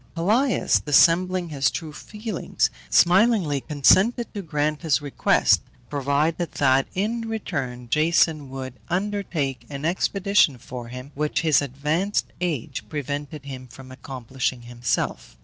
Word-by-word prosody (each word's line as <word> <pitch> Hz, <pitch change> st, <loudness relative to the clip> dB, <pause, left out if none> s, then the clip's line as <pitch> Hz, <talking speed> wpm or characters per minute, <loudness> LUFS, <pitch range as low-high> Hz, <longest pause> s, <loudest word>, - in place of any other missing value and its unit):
Pelias, 220 Hz, +11 st, +2 dB
dissembling 175 Hz, +4 st, +4 dB
his 140 Hz, -3 st, +1 dB
true 160 Hz, -3 st, -6 dB
feelings, 210 Hz, +4 st, -3 dB, 0.2 s
smilingly 180 Hz, -, +4 dB
consented 190 Hz, -, +3 dB
to 205 Hz, -, -4 dB
grant 150 Hz, -3 st, -1 dB
his 160 Hz, -4 st, +2 dB
request, 145 Hz, -2 st, +2 dB, 0.3 s
provided 145 Hz, +4 st, 0 dB
that, 135 Hz, -1 st, +3 dB
in 225 Hz, +4 st, -1 dB
return, 135 Hz, -, -4 dB
Jason 155 Hz, +1 st, +2 dB
would 130 Hz, -1 st, -6 dB, 0.2 s
undertake 175 Hz, -, -2 dB
an 140 Hz, +1 st, -5 dB
expedition 190 Hz, -3 st, +2 dB
for 120 Hz, 0 st, -8 dB
him, 125 Hz, +3 st, -9 dB
which 150 Hz, +1 st, -1 dB
his 155 Hz, -4 st, +4 dB
advanced 150 Hz, +9 st, -1 dB
age 160 Hz, -10 st, -2 dB
prevented 145 Hz, 0 st, -5 dB
him 130 Hz, -2 st, -8 dB
from 130 Hz, +1 st, -13 dB
accomplishing 130 Hz, -1 st, -4 dB
himself. 120 Hz, -, -3 dB
150 Hz, 120 wpm, -24 LUFS, 135-180 Hz, 0.3 s, dissembling